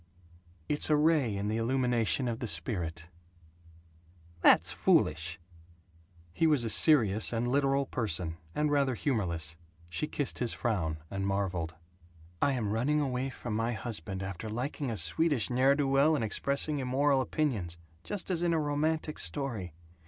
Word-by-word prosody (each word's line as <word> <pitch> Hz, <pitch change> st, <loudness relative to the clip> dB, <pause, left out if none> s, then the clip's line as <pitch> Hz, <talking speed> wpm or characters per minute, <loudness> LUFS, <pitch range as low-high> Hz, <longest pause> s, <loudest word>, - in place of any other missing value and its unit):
"It's 150 Hz, -, +2 dB
a 155 Hz, -, +5 dB
ray 150 Hz, -8 st, +2 dB
in 100 Hz, +1 st, -2 dB
the 110 Hz, +1 st, -1 dB
illumination 125 Hz, +1 st, +1 dB
of 115 Hz, -1 st, -3 dB
the 120 Hz, -, -3 dB
spirit." 85 Hz, -3 st, -3 dB, 1.3 s
"That's -, -, +5 dB
foolish." 80 Hz, +2 st, +1 dB, 0.9 s
He 165 Hz, -, +2 dB
was 150 Hz, -6 st, +3 dB
a 115 Hz, -, +2 dB
serious 110 Hz, -10 st, +5 dB
and 120 Hz, +1 st, -1 dB
literal 140 Hz, +1 st, +2 dB
person, 90 Hz, -10 st, -3 dB, 0.2 s
and 150 Hz, 0 st, +1 dB
rather 140 Hz, -3 st, +2 dB
humorless. 85 Hz, -, -2 dB, 0.3 s
She 85 Hz, -, -2 dB
kissed 145 Hz, -3 st, -2 dB
his 120 Hz, -2 st, +1 dB
frown, 95 Hz, -10 st, -1 dB
and 95 Hz, 0 st, -2 dB
marveled: 90 Hz, -5 st, -2 dB, 0.7 s
"I 140 Hz, -, +3 dB
am 110 Hz, -6 st, -2 dB
running 130 Hz, +8 st, +1 dB
away 135 Hz, -2 st, -1 dB
from 120 Hz, -4 st, -5 dB
my 115 Hz, +2 st, 0 dB
husband, 100 Hz, -4 st, -5 dB
after 95 Hz, +3 st, -6 dB
liking 130 Hz, +4 st, -3 dB
a 110 Hz, -, -3 dB
Swedish 115 Hz, -, +1 dB
ne'er 130 Hz, +3 st, +4 dB
do 145 Hz, -1 st, 0 dB
well 140 Hz, +4 st, +4 dB
and 140 Hz, -, -1 dB
expressing 140 Hz, +7 st, -1 dB
immoral 135 Hz, +1 st, +2 dB
opinions, 115 Hz, -, -2 dB, 0.3 s
just 200 Hz, -2 st, -3 dB
as 170 Hz, -2 st, 0 dB
in 175 Hz, -1 st, +2 dB
a 160 Hz, -, +2 dB
romantic 155 Hz, +1 st, -1 dB
story. 100 Hz, -, -3 dB
120 Hz, 150 wpm, -30 LUFS, 100-145 Hz, 1.3 s, a